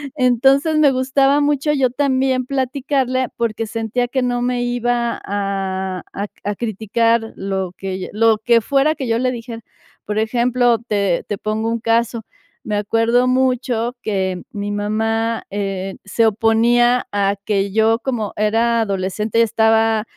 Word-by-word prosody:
Entonces, 270 Hz, +4 st, +3 dB
me 285 Hz, -3 st, +5 dB
gustaba 270 Hz, +2 st, +2 dB
mucho 290 Hz, +1 st, +1 dB
yo 265 Hz, -3 st, +2 dB
también 260 Hz, -1 st, +1 dB
platicarle 260 Hz, -1 st, -1 dB
porque 225 Hz, -1 st, -2 dB
sentía 225 Hz, +2 st, -2 dB
que 260 Hz, +2 st, -1 dB
no 245 Hz, -1 st, -1 dB
me 245 Hz, 0 st, 0 dB
iba 245 Hz, -1 st, -1 dB
a 190 Hz, -2 st, -3 dB
a 200 Hz, -, -3 dB
cri -, -, -46 dB, 0.2 s
a 205 Hz, -, -5 dB
criticar 225 Hz, +1 st, 0 dB
lo 190 Hz, -2 st, -3 dB
que 190 Hz, -1 st, -4 dB
yo, 185 Hz, -, -5 dB
lo 225 Hz, 0 st, +3 dB
que 235 Hz, -1 st, +4 dB
fuera 280 Hz, +6 st, +2 dB
que 270 Hz, -4 st, -4 dB
yo 225 Hz, -, +1 dB
le 255 Hz, 0 st, +1 dB
dijera. 230 Hz, -1 st, -7 dB, 0.5 s
Por 210 Hz, +1 st, -2 dB
ejemplo, 240 Hz, +1 st, +2 dB
te 200 Hz, -6 st, -1 dB
te 205 Hz, -, -3 dB
pongo 215 Hz, +2 st, -2 dB
un 230 Hz, 0 st, -1 dB
caso, 230 Hz, 0 st, +1 dB, 0.4 s
me 210 Hz, -, -3 dB
acuerdo 230 Hz, +4 st, +2 dB
mucho 255 Hz, -2 st, 0 dB
que 190 Hz, -3 st, -2 dB
mi 205 Hz, 0 st, -4 dB
mamá, 225 Hz, +2 st, -1 dB
eh, 195 Hz, -1 st, -3 dB
se 225 Hz, +3 st, +2 dB
oponía 235 Hz, +3 st, +3 dB
a 200 Hz, 0 st, +1 dB
que 200 Hz, -2 st, 0 dB
yo 220 Hz, +2 st, +3 dB
como 240 Hz, -6 st, -3 dB
era 225 Hz, +2 st, +2 dB
adolescente, 200 Hz, +2 st, -1 dB
estaba, 220 Hz, -1 st, +2 dB
230 Hz, 150 wpm, -19 LUFS, 210-250 Hz, 0.5 s, me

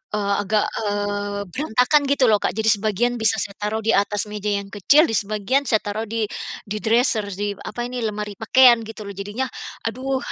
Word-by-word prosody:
eee, 200 Hz, -1 st, 0 dB
agak, 210 Hz, +1 st, +1 dB, 0.2 s
eee, 205 Hz, -1 st, -2 dB
berantakan 260 Hz, -, +2 dB
gitu 280 Hz, -1 st, +2 dB
loh, 210 Hz, -, +4 dB
Kak. -, -, -2 dB
Jadi 220 Hz, 0 st, +1 dB
sebagian 220 Hz, +3 st, 0 dB
bisa 220 Hz, -2 st, +2 dB
saya 200 Hz, -, -8 dB
taruh 215 Hz, +1 st, -2 dB
di 225 Hz, -, +2 dB
atas 205 Hz, 0 st, +1 dB
meja 210 Hz, 0 st, -5 dB
yang 200 Hz, 0 st, -10 dB
kecil, 280 Hz, -, +5 dB
di 245 Hz, -, 0 dB
sebagian 215 Hz, +7 st, -1 dB
saya 220 Hz, -2 st, +2 dB
taruh 215 Hz, +2 st, -3 dB
di 225 Hz, +1 st, -2 dB, 0.4 s
di 210 Hz, +1 st, -5 dB
dresser 225 Hz, -1 st, +2 dB
di, 205 Hz, +1 st, -2 dB
apa 240 Hz, -, -5 dB
ini, 245 Hz, 0 st, -4 dB
lemari 210 Hz, 0 st, -4 dB
pakaian 240 Hz, +1 st, +6 dB
gitu 220 Hz, -1 st, -8 dB
loh. 200 Hz, -, -7 dB
Jadinya, 205 Hz, +6 st, -4 dB, 0.4 s
aduh 260 Hz, +3 st, -2 dB
215 Hz, 190 wpm, -22 LUFS, 205-240 Hz, 0.4 s, pakaian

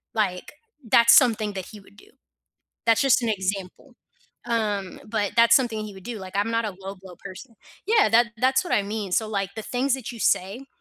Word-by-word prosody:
like, 195 Hz, -1 st, -2 dB, 0.3 s
that's 235 Hz, 0 st, +5 dB
something 220 Hz, -5 st, +4 dB
that 190 Hz, -2 st, -6 dB
he 215 Hz, -, -12 dB
would 200 Hz, 0 st, -20 dB
do. 415 Hz, -, -19 dB, 0.8 s
That's 225 Hz, -1 st, +3 dB
just 270 Hz, -2 st, +3 dB
an 230 Hz, -, 0 dB
example. 190 Hz, -2 st, -4 dB, 0.5 s
Um, 210 Hz, -5 st, -2 dB
but 210 Hz, -2 st, -1 dB
that's 235 Hz, 0 st, +6 dB
something 230 Hz, -5 st, 0 dB
he 210 Hz, -, -9 dB
would 190 Hz, -, -13 dB
do, 235 Hz, -2 st, -6 dB
like, 190 Hz, 0 st, -10 dB
I'm 205 Hz, +3 st, 0 dB
not 230 Hz, 0 st, 0 dB
a 205 Hz, -3 st, -5 dB
low 195 Hz, +1 st, -7 dB
blow 185 Hz, -2 st, -12 dB
person. 225 Hz, +6 st, -11 dB, 0.3 s
Yeah, 440 Hz, -, +4 dB
that 235 Hz, +2 st, +4 dB
that's 265 Hz, +6 st, +2 dB
what 355 Hz, -, -3 dB
I 205 Hz, -, +2 dB
mean. 205 Hz, -1 st, -5 dB
So, 220 Hz, +4 st, +1 dB
like, 200 Hz, -2 st, -3 dB
the 220 Hz, -, -6 dB
things 255 Hz, +2 st, -1 dB
that 255 Hz, -3 st, -7 dB
you 235 Hz, -, -11 dB
say, 215 Hz, +8 st, 0 dB
215 Hz, 210 wpm, -24 LUFS, 195-235 Hz, 0.8 s, that's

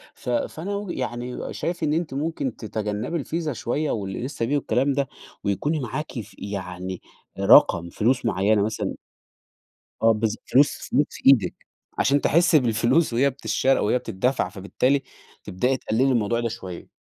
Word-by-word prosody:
ف -, -, -7 dB
فأنا 165 Hz, +10 st, -2 dB
وِجهة 200 Hz, -6 st, -4 dB
يعني 125 Hz, 0 st, -4 dB
شايف 175 Hz, 0 st, -3 dB
إن 150 Hz, -1 st, +2 dB
أنتِ 160 Hz, -4 st, -1 dB
ممكن 140 Hz, -3 st, -2 dB
تتجنبي 110 Hz, +7 st, -3 dB
الفيزا 160 Hz, 0 st, -3 dB
شوية 145 Hz, +6 st, -2 dB
والInstaPay 110 Hz, +7 st, -4 dB
والكلام 140 Hz, -1 st, +1 dB
ده، 140 Hz, -1 st, 0 dB, 0.4 s
ويكون 145 Hz, +10 st, 0 dB
معاكِ 150 Hz, +6 st, -4 dB
ف 110 Hz, -, -10 dB
يعني 95 Hz, -2 st, -5 dB, 0.4 s
رقم 85 Hz, 0 st, +6 dB
فلوس 120 Hz, +8 st, +1 dB
معينة 100 Hz, +3 st, +2 dB
مثلًا 110 Hz, +1 st, -2 dB, 1.1 s
آه 115 Hz, 0 st, +6 dB
بالضبط، 110 Hz, 0 st, -2 dB
فلوس، 140 Hz, +3 st, +2 dB
فلوس 145 Hz, +3 st, +3 dB
في -, -, -11 dB
إيدِك، 115 Hz, -10 st, +4 dB, 0.3 s
عشان 140 Hz, +1 st, +3 dB
تحسّي 165 Hz, 0 st, +4 dB
بالفلوس 120 Hz, +4 st, +2 dB
وهي 135 Hz, +4 st, +3 dB
بتشّرى 135 Hz, 0 st, +1 dB
وهي 115 Hz, +4 st, +2 dB
بتدَّفع 125 Hz, -1 st, -1 dB
فبالتالي 120 Hz, +8 st, 0 dB, 0.4 s
تبدئي 125 Hz, +9 st, 0 dB
تقللي 120 Hz, +1 st, 0 dB
الموضوع 120 Hz, -3 st, +1 dB
ده 115 Hz, -, -1 dB
شوية. 95 Hz, -6 st, -8 dB
125 Hz, 145 wpm, -24 LUFS, 105-145 Hz, 1.1 s, رقم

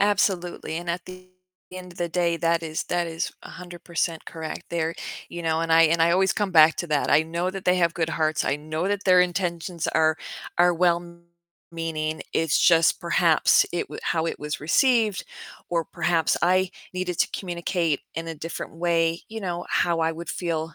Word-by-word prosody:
Absolutely, 185 Hz, -5 st, 0 dB
and 175 Hz, +1 st, -6 dB
at 170 Hz, 0 st, -4 dB
the 185 Hz, 0 st, -12 dB, 0.4 s
end 180 Hz, -1 st, -9 dB
of -, -, -17 dB
the 175 Hz, -1 st, -1 dB
day, 170 Hz, 0 st, 0 dB
that 165 Hz, 0 st, +1 dB
is 160 Hz, -1 st, -3 dB
that 175 Hz, -1 st, -1 dB
is 165 Hz, 0 st, -3 dB
100% 175 Hz, -2 st, -4 dB
correct 160 Hz, -1 st, -6 dB
there, 165 Hz, -1 st, -1 dB, 0.3 s
you 175 Hz, -, -7 dB
know, 160 Hz, -1 st, 0 dB
and 165 Hz, 0 st, 0 dB
I 165 Hz, -, +7 dB
and 165 Hz, +1 st, +3 dB
I 165 Hz, -, +4 dB
always 190 Hz, +2 st, +3 dB
come 205 Hz, -2 st, -1 dB
back 160 Hz, -2 st, +6 dB
to 175 Hz, -, -3 dB
that, 150 Hz, -2 st, +1 dB
I 150 Hz, +2 st, +5 dB
know 170 Hz, +3 st, -2 dB
that 195 Hz, 0 st, -7 dB
they 180 Hz, 0 st, +3 dB
have 170 Hz, -2 st, +2 dB
good 160 Hz, -1 st, -1 dB
hearts, 155 Hz, -1 st, 0 dB
I 140 Hz, -, 0 dB
know 155 Hz, +4 st, -3 dB
that 205 Hz, 0 st, -2 dB
their 185 Hz, -1 st, +6 dB
intentions 175 Hz, -2 st, -1 dB
are 155 Hz, 0 st, +2 dB, 0.4 s
are 175 Hz, 0 st, +5 dB
well-meaning, 170 Hz, -2 st, -3 dB
it's, 160 Hz, -2 st, +2 dB
just, 165 Hz, -2 st, +4 dB
perhaps 170 Hz, -1 st, +4 dB
it 175 Hz, -, 0 dB
w -, -, -8 dB
how 160 Hz, 0 st, 0 dB
it -, -, -3 dB
was 150 Hz, 0 st, -4 dB
received, 220 Hz, -, +2 dB, 0.5 s
or 170 Hz, -2 st, 0 dB
perhaps 165 Hz, -1 st, 0 dB
I 185 Hz, +1 st, +3 dB, 0.2 s
needed 180 Hz, -2 st, -3 dB
to -, -, +3 dB
communicate 170 Hz, -4 st, -1 dB
in 165 Hz, 0 st, -4 dB
a 165 Hz, -, -4 dB
different 160 Hz, +2 st, -7 dB
way, 165 Hz, -1 st, +1 dB
you 225 Hz, 0 st, -6 dB
know, 175 Hz, -3 st, -4 dB
how 170 Hz, -1 st, +1 dB
I 160 Hz, 0 st, +1 dB
would 165 Hz, 0 st, -8 dB
feel, 165 Hz, -2 st, -3 dB
170 Hz, 190 wpm, -24 LUFS, 165-180 Hz, 0.5 s, I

